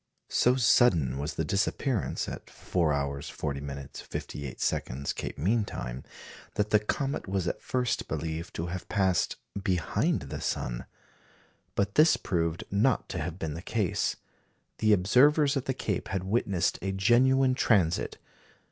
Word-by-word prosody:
So 125 +1 +4
sudden 95 - +4
was 75 +3 -3
the 80 - -1
disappearance 105 - 0
(at - - -7
4h. 70 -5 -1
50m. 70 -1 -5
58s., 70 0 -3
Cape - - -5
mean 105 +7 +2
time), - - -6 0.5
that 105 0 0
the 105 - +6
comet 135 +6 -2
was 95 -2 -1
at - - -2
first 125 -3 -1
believed 80 +2 -4
to 80 - -2
have 90 +1 -6
passed 95 -5 +1 0.3
behind 90 -4 +1
the - - -6
sun. - - -3 0.9
But 100 0 0
this 155 +5 +6
proved 85 -3 -1
not 110 +5 +2
to 90 - -3
have 80 +2 -4
been 80 -4 -3
the 85 - -6
case. 105 -1 0 0.6
The 110 - +3
observers 140 - +5
at 135 - -1
the 130 - -1
Cape 105 -7 -2
had 95 -1 -2
witnessed 95 -3 0
a 95 - -1
genuine 130 +7 +4
transit. 95 -9 +2
95 Hz, 140 wpm, -29 LUFS, 80-115 Hz, 0.9 s, the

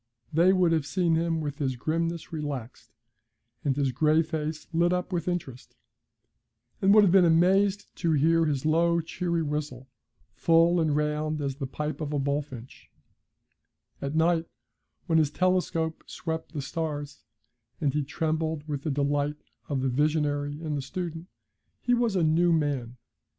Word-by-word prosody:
They 170 +4 +5
would 185 -3 +3
have 160 -3 +1
seen 175 -3 +1
him 165 0 0
with 145 0 -5
his 135 -3 -1
grimness 165 +5 -2
relaxed, 140 -6 -6 0.7
and 140 -3 +1
his 140 -2 +1
gray 155 +5 +3
face 155 -1 -4
lit 170 +1 +3
up 180 +1 -2
with 170 -1 -2
interest, 155 -9 -4 1.1
and 195 - +4
would 215 - +8
have 190 - +4
been 190 0 +6
amazed 190 +4 +3
to 165 -3 +1
hear 165 +3 +3
his 145 -2 -1
low, 170 +2 +3
cheery 170 0 -2
whistle, 145 -4 -4 0.5
full 165 +1 +4
and 155 -2 +1
round 150 +1 -1
as 140 -2 -3
the 135 -3 -4
pipe 150 +2 -4
of 150 -1 -3
a - - +1
bullfinch; 140 -3 -4 1.1
at 140 +2 -3
night, 165 0 +2 0.6
when 160 -1 +3
his 155 -3 +2
telescope 175 -2 0
swept 160 0 -5
the 145 -3 -3
stars, 145 -1 -4 0.6
and 140 -3 0
he 150 0 0
trembled 160 0 -2
with 145 -3 -3
the 155 - -3
delight 145 +1 -1 0.3
of 140 -3 -1
the 135 - 0
visionary 145 +1 0
and 155 -2 -2
the 140 - -2
student, 165 +3 -5 0.5
he 245 - +1
was 235 -4 +1
a 180 - +2
new 165 +2 +3
man. 140 -7 -1
155 Hz, 160 wpm, -27 LUFS, 145-170 Hz, 1.1 s, would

